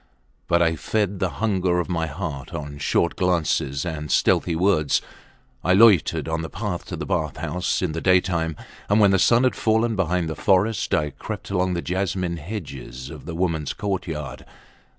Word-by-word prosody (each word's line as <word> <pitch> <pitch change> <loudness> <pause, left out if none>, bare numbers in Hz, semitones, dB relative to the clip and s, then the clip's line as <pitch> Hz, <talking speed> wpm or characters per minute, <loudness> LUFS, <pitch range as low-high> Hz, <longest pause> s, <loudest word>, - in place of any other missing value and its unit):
But 85 0 +3
I 80 -1 +2
fed 100 +3 -1
the 95 - +1
hunger 95 -5 0
of 90 - -2
my 85 -2 -1
heart 80 0 -5
on 75 -2 -6
short 85 - +1
glances 85 -6 0
and 75 -3 -4
stealthy 85 - +2
words. 85 -4 +2 0.6
I 90 - +3
loitered 100 -6 +5
on 80 0 -1
the 80 - -5
path 100 -4 -4
to - - -5
the - - -5
bath 75 -3 -1
houses 90 +4 -1
in 90 - 0
the 80 +1 -4
daytime, 90 -3 +2 0.3
and 105 +2 +4
when 100 -2 +6
the 95 - +3
sun 115 +6 +4
had 130 - +3
fallen 110 +1 +1
behind 90 -2 0
the 80 - -4
forest 100 +4 +1
I 75 -1 0
crept - - -7
along 90 -1 +1
the 85 - -3
jasmine 90 -1 -1
hedges 70 - -7
of - - -10
the 85 0 -6
womens 85 -5 -1
courtyard. 80 -9 -4
90 Hz, 180 wpm, -23 LUFS, 80-95 Hz, 0.6 s, when